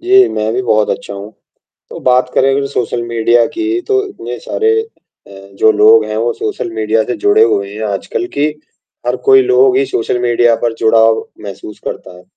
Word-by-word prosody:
जी, 385 +2 +4
मैं 110 +1 -2
भी 125 - -1
बहुत 110 -3 +1
अच्छा 100 - -5
हूँ। 100 +2 -9 0.6
तो - - -9
बात 125 0 +2
करें 135 - +3
अगर 140 +1 0
सोशल 120 -3 -3
मीडिया 115 0 +2
की, 350 +1 -3
तो 400 +1 0
इतने 390 - -8
सारे 445 -3 0 0.5
अ, - - -17 0.3
जो 110 +2 +4
लोग 110 +1 +5
हैं, 110 0 -5
वो 115 +2 0
सोशल 110 +2 -4
मीडिया 110 0 0
से - - -4
जुड़े 410 +4 +3
हुए 100 - 0
हैं 110 - -7
आजकल, 100 - -3
कि 145 -2 -1 0.6
हर - - +1
कोई 400 -1 +7
लोग 395 0 +3
ही 405 - +2
सोशल 385 - -2
मीडिया 120 -1 +2
पर 120 -1 0
जुड़ाव 110 0 +3 0.2
महसूस 105 +1 -9
करता 90 - -7
है 90 - -16
120 Hz, 195 wpm, -14 LUFS, -, 0.6 s, कोई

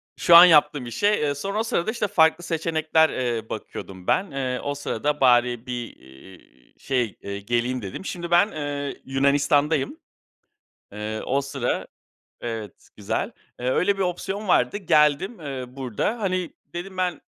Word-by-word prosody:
Şu 170 - +5
an 170 +1 +12
yaptığım 150 -5 +4
işe. 120 - 0
Eee, 150 -9 +1
sonra 195 +9 -3
o - - +1
sırada, 220 -3 -1
işte, 220 -2 -1
farklı 170 -3 +3
seçenekler, 160 -1 +1
eee, 120 -3 -2
bakıyordum 95 -3 -8
ben. 195 +1 +1
Eee, 130 -2 -2
o 145 0 -2
sırada 145 +1 -2
bari 120 -2 +3
bir, 120 -2 -6 0.4
ııı, - - -19 0.4
şeyy, 125 -6 -1
eee, 100 0 -5
geleyim 120 +4 -1
dedim. 100 - -7
Şimdi 175 -3 -5
ben, 175 +5 +4
eee, 145 -2 -4
Yunanistan'dayım. 140 +2 +1 1.0
Eee, 105 +1 -4
o 135 +2 +1
sıra, 135 -3 -2 0.5
evet 110 -4 -7
güzel. - - -2 0.3
Eee, 125 - -1
öyle 195 +8 +2
bir 195 - -1
opsiyon 190 +3 -3
vardı 125 -2 +3
geldim, 170 +2 +2
eee, 135 -4 -5
burada. 130 - -3
Hani, 185 -3 -1 0.2
dedim 185 +2 -6
ben, 180 -4 -1
145 Hz, 150 wpm, -24 LUFS, 125-175 Hz, 1.0 s, an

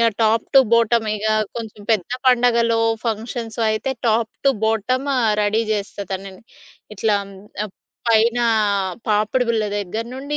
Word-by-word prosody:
Yeah! 230 -2 +3
Top 220 +1 +2
to - - +9
bottom 230 0 +3
ఇగ 210 +1 -4 0.3
కొంచెం 220 -3 -7
పెద్ద 205 -3 -1 0.2
పండగలో, 235 -2 +3 0.3
ఫంక్షన్స్ 225 +1 -4
అయితే, 215 +5 -1 0.2
టాప్ 225 0 +1
టు - - +7
బోటం 225 +4 0
ఆ! - - +2 0.2
రెడీ 210 +2 +1
జేస్తా 205 -1 -4
తనని. 190 0 -7 0.5
ఇట్లా 210 +1 +1
ఆహ్, 195 0 -13 0.3
అప్ 195 - -18 0.3
పైన 230 +2 +3 0.7
పాపిడి 215 +4 +1
బిళ్ళ 225 -2 +1
దగ్గర 205 +3 -4
నుండి, 280 +3 -4
225 Hz, 145 wpm, -20 LUFS, 210-235 Hz, 0.7 s, టు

